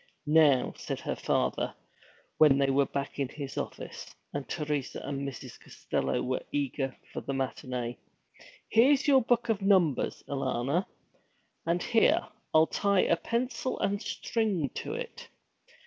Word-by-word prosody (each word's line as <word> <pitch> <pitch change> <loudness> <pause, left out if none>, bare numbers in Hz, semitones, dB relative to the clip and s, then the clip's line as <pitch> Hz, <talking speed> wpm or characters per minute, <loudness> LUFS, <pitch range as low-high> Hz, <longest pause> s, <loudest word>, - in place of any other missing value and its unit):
'Now,' 150 -4 +4
said - - -4
her - - -2
father, - - 0 0.6
when 150 -3 +7
they 135 -1 +3
were 140 +1 +3
back 140 +1 -4
in 135 -2 0
his 140 -2 -7
office, - - -5 0.3
and 145 -1 -4
Teresa 150 -4 -2
and 140 -1 -3
Mrs. 130 -2 -10
Costello 65 0 -2
were 130 +1 -1
eager 135 -2 -2 0.2
for - - -4
the 140 - -4
matinée, 125 -2 -3 0.7
'here's 270 +6 +4
your 270 -2 +6
book 240 0 +1
of 215 -3 +1
numbers, 185 -8 +2
Alanna. 135 +4 -1 0.8
And 170 +1 +1
here, 225 -2 +3 0.2
I'll 155 0 +6
tie 200 +2 +2
a 170 - +3
pencil 250 +7 -2
and 200 0 0
a - - -7
string 200 - -1
to - - -4
it. 480 0 -7
150 Hz, 145 wpm, -29 LUFS, 135-205 Hz, 0.8 s, when